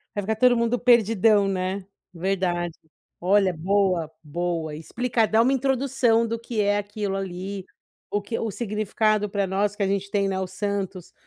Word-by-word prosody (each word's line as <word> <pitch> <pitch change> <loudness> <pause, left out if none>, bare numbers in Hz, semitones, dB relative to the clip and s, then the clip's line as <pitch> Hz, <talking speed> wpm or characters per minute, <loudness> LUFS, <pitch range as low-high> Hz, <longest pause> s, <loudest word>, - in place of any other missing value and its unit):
Vai 205 - -1
ficar 220 +3 -1
todo 245 +2 +4
mundo 235 +1 +1
perdidão, 220 -4 +4
né, 190 0 -2 0.3
verdade. 175 -2 -1 0.4
Olha 190 0 +3
boa, 180 -2 +1
boa, 160 0 -3
explicar, 230 +8 0
dar 220 +1 +4
uma 260 +4 +3
introdução 260 -3 +2
do 230 +1 -2
que 230 -1 -5
é 205 0 +3
aquilo 205 -1 -3
ali, 190 +1 -5 0.5
o 205 - -1
que, 225 +3 -4
o 225 -2 -2
significado 215 0 0
pra 200 -1 -1
nós, 195 +2 0
que 205 - -1
a - - +1
gente 200 0 -2
tem, 200 -1 +1
né, 190 -1 -1
os 185 -1 -4
Santos, 200 -2 -4
200 Hz, 170 wpm, -24 LUFS, 190-225 Hz, 0.5 s, todo